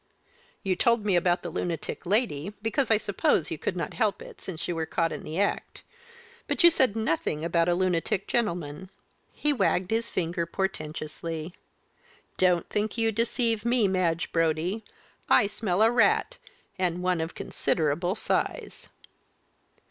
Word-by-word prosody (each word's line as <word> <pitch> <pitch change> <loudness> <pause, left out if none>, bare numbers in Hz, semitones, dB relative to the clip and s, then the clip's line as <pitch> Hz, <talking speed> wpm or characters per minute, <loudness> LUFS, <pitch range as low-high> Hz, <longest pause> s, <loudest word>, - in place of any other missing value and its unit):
"You 190 -1 +1
told 235 0 +2
me 200 -3 +3
about 175 0 +2
the 170 - -5
lunatic 170 +1 -4
lady, 200 - 0
because, 240 +4 0
I 220 - +5
suppose, 200 -5 +1
you 155 - -4
could 185 - -2
not 165 -4 -3
help 215 -4 0
it - - -12
since 170 -3 -6
you 175 - -2
were 160 -1 -2
caught 165 -1 0
in - - -5
the 160 +4 -5
act 200 - -1 0.6
but - - 0
you 340 - +9
said 260 -9 +2
nothing 165 -7 -1
about 170 0 +2
a 175 - +3
lunatic 185 +1 0
gentleman." 180 -6 -2 0.4
He 295 0 0
wagged 190 -5 +1
his 225 +1 0
finger 170 -1 -1
portentously. 160 -2 -4 0.8
"Don't 180 -2 +3
think 210 +2 -2
you 225 -1 +2
deceive 230 0 0
me, 235 -3 +3
Madge 175 -3 0
Brodie 165 +6 0 0.5
I 235 - +6
smell 205 -1 0
a 225 - +5
rat, 435 - +3 0.4
and 180 -1 0
one 180 -2 +1
of 160 +1 -4
considerable 170 +4 0
size." - - -2
185 Hz, 155 wpm, -27 LUFS, 165-220 Hz, 0.8 s, you